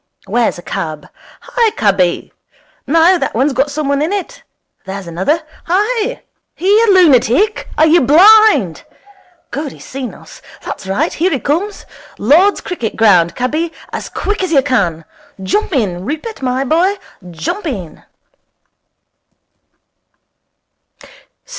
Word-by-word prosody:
Where's 240 -5 0
a 175 - -11
cab? 155 -3 -5 0.3
Hi, 465 -2 +1
cabby! 190 -4 0 0.5
No, 330 +5 +4
that - - -3
one's 265 +4 +1
got 270 +3 0
some 295 0 -3
one 280 0 0
in 315 +5 -1
it. 410 +5 -4 0.4
There's 195 0 -6
another. 190 - -1 0.2
Hi! 430 +6 -1 0.3
Here, 415 +5 +3
lunatic! 360 - +3
Are 310 - +5
you 325 +2 +4
blind? 325 - +5 0.7
Good, 290 -1 -4
he's - - -14
seen 260 -2 -6
us. - - -15 0.2
That's - - -7
right. 255 - -1
Here 350 +4 +1
he 280 - -1
comes. 350 +11 -2 0.3
Lord's 335 - +3
Cricket 245 - -4
Ground, 180 -6 +3
cabby, 305 +7 -2 0.2
as - - -5
quick 415 0 -3
as 370 - -2
you 275 -4 +4
can. 175 -12 -1 0.4
Jump 395 - -1
in, 195 - -1
Rupert, 315 - -5
my 255 0 -1
boy, 340 +8 +1 0.3
jump 175 - -4
in.' 195 - -6
290 Hz, 130 wpm, -15 LUFS, -, 0.7 s, Are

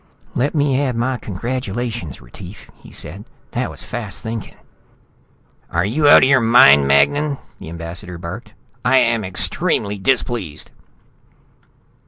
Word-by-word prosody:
"Let 140 +6 -1
me 145 -2 +2
add 130 -4 -1
my 125 +2 -1
congratulations, 115 - -4
Retief," 90 - -12
he - - -16
said. 100 +3 -7 0.3
"That 120 0 -2
was - - -10
fast 110 -4 -6
thinking 110 -2 -6 0.6
" - - -37
"Are 85 +2 +1
you 145 +8 +2
out - - +8
of - - +5
your 140 -2 +5
mind, 70 - +6
Magnan?" 140 - +3 0.2
the - - -9
ambassador 85 +2 -7
barked. 105 +6 -8 0.3
"I 130 - +4
am 115 -3 +2
extremely 100 +2 -1
displeased!" 100 - -1
110 Hz, 135 wpm, -19 LUFS, 90-125 Hz, 0.6 s, out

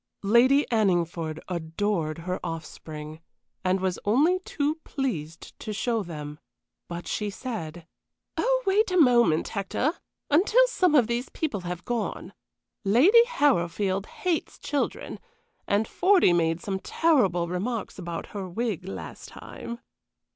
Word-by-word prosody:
Lady 250 +7 +5
Anningford 170 -7 +1
adored 170 -1 -2
her 185 0 -2
offspring, 155 -1 -7 0.4
and 185 +1 +2
was 185 -1 -1
only 295 - +3
too 305 -4 -2
pleased 165 - -4
to 215 - -5
show 225 +2 0
them; 150 -5 -7 0.5
but 175 0 -6
she 210 -1 -2
said: 180 - -6 0.5
"Oh, - - +1
wait 405 +3 +3
a 365 - +1
moment, 235 - +4
Hector, 215 - -1 0.4
until 425 +11 +5
some 365 -10 +2
of 255 -5 +6
these 235 +3 -2
people 285 -11 -2
have 180 -1 -6
gone. 240 -2 -3 0.5
Lady 295 - +6
Harrowfield 195 - +1
hates 350 -4 -2
children, 285 -1 -3 0.5
and 205 +2 +2
Fordy 370 - +4
made 165 0 +1
some 195 -2 -3
terrible 195 - +2
remarks 205 +6 -3
about 170 -2 -5
her 195 -3 -5
wig 205 -2 -2
last 195 - -7
time." 235 +1 -8
205 Hz, 125 wpm, -26 LUFS, 175-275 Hz, 0.5 s, of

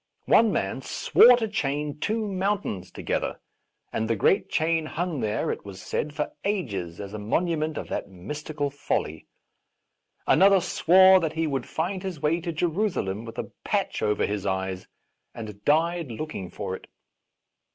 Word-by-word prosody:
One 225 -2 +5
man 95 - -1
swore 245 - +6
to 225 -2 -1
chain 150 -7 -2
two 220 +4 -1
mountains 190 - -2
to - - -8
gether, - - -1 0.5
and 110 0 -1
the 115 - +2
great 150 - +2
chain 160 0 +1
hung 170 -2 -2
there, 105 -2 -1
it - - -5
was 100 -2 -9
said, 150 - -3
for 150 - -2
ages 100 - -2
as 100 0 -7
a 105 - -5
monument 155 +7 0
of - - -4
that - - -3
mystical 145 - -4
folly. 110 - -3 1.0
Another 195 +1 +6
swore 185 +2 +6
that 160 -3 -2
he 160 0 0
would 135 -5 -2
find 180 +4 -2
his 185 -5 -5
way 155 +3 +1
to 170 0 -3
Jerusalem 160 - -1
with 115 - -9
a - - -5
patch - - -1
over 105 -1 +1
his 100 -1 -3
eyes, 95 -1 -2 0.5
and 105 -3 -8
died 165 +1 +2
looking 115 - -5
for 95 - -4
it. - - -12
150 Hz, 160 wpm, -26 LUFS, -, 1.0 s, swore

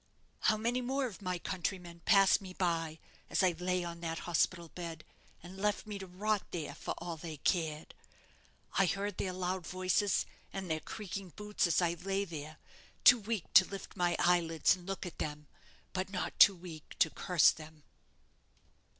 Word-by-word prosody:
How 215 - +3
many 235 +3 0
more 265 +2 0
of 220 -5 -7
my 180 -2 -2
countrymen 175 -1 -4
passed 195 -2 +6
me 185 -2 -9
by 165 -3 -1 0.3
as - - +2
I 185 - +5
lay 180 +1 -1
on 170 -1 -6
that 165 -1 -3
hospital 170 0 +1
bed, 165 -2 -7 0.4
and 180 +2 -10
left 210 +2 0
me 210 -2 -5
to 190 - -7
rot 205 +3 0
there, 165 -4 -4
for - - -5
all 170 -2 -5
they 160 -1 -7
cared? 155 -1 -1 0.9
I 195 - +5
heard 200 +1 -2
their 185 - -1
loud 180 -1 -3
voices 185 +2 +1 0.3
and 190 -3 -4
their 160 - 0
creaking 195 -1 -7
boots 210 -2 0
as 170 +1 +3
I 170 -1 +2
lay 195 +3 -2
there, 155 -3 -7 0.5
too 245 - +9
weak 215 -4 -4
to 190 - +10
lift 195 +1 -8
my 175 -2 +1
eyelids 170 -3 +3
and 180 0 -14
look 195 -1 -4
at 175 - -8
them; 150 0 -4 0.5
but 185 +1 -2
not 185 -2 -4
too 200 - +9
weak 170 -4 -10
to 160 - +4
curse 180 -5 +4
them." 155 -1 -12
180 Hz, 175 wpm, -33 LUFS, 170-195 Hz, 0.9 s, to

